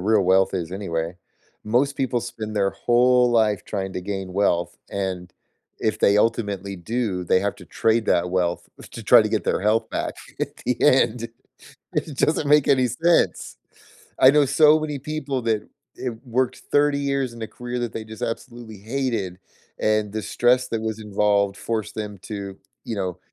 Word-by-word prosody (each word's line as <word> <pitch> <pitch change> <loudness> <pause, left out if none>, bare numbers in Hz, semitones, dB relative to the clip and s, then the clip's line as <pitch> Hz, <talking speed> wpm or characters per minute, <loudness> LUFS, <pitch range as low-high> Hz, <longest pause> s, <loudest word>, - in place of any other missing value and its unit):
real 105 +1 +3
wealth 95 +1 +3
is 90 -1 -3
anyway. 85 -3 -3 0.5
Most 130 +6 +1
people 125 -3 0
spend 110 -2 -6
their 100 -1 +2
whole 125 0 +3
life 110 -4 +2
trying 95 -2 -4
to - - -4
gain 95 -1 -5
wealth, 90 -3 +1
and 90 -3 -4 0.5
if 110 -1 -1
they 100 -1 +4
ultimately 100 -3 0
do, 100 -1 -2
they 95 - +3
have 100 +1 -1
to - - -14
trade 115 0 +1
that 90 +1 +2
wealth 90 -2 -1 0.2
to - - -8
try - - +7
to - - 0
get - - -1
their - - 0
health 110 +2 +1
back - - -3 0.3
at - - -3
the 125 - 0
end. 120 -4 +3 0.7
It 150 -4 -2
doesn't 155 -1 +1
make 150 -1 +5
any 130 -3 +4
sense. 170 +8 +1 0.6
I 130 - +8
know 145 -1 +4
so 150 +2 +5
many 150 -2 -3
people 140 -3 -3
that 110 -2 -1 0.3
i 130 - -3 0.2
worked 125 +1 -1
30 145 0 +3
years 140 -3 -1
in 115 - -9
a 110 - -2
career 125 +2 -6
that 120 -2 -3
they 110 - -5
just 110 -1 -10
absolutely 115 -2 -6
hated, 110 -5 -3 0.4
and 110 -1 +1
the 110 -1 -3
stress 125 +1 +2
that 115 - -2
was 110 0 -3
involved 100 -1 +1
forced 110 -2 -3
them 105 -2 -5
to, 100 -2 -6 0.3
you 115 - -4
know, 90 -2 -3
110 Hz, 175 wpm, -23 LUFS, 100-125 Hz, 0.7 s, I